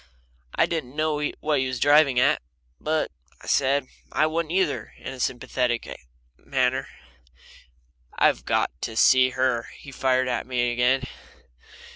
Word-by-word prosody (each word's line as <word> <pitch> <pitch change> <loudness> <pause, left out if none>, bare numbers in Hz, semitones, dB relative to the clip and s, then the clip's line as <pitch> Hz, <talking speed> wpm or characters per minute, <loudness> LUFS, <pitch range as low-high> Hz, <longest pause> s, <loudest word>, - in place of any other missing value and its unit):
I - - +4
didn't 150 -6 -4
know 155 -1 0 0.2
what 150 -2 +1
he 130 - 0
was 130 -2 -4
driving 145 -2 +5
at, - - +3 0.4
but 155 0 -1 0.3
I - - -15
said, 140 0 +2 0.3
"I 155 - +2
wouldn't, 160 0 -2
either," 180 -5 -1
in 130 - -7
a 130 - -11
sympathetic 125 -1 -1 0.6
manner. 130 0 0 1.3
"I've - - +3
got - - 0
to 110 - -4
see 130 +1 +6
her!" 130 -3 +1
he 140 - -12
fired 130 -1 +1
at 125 -1 -2
me 120 -1 0
again. 125 +2 +2
130 Hz, 140 wpm, -24 LUFS, 125-150 Hz, 1.3 s, see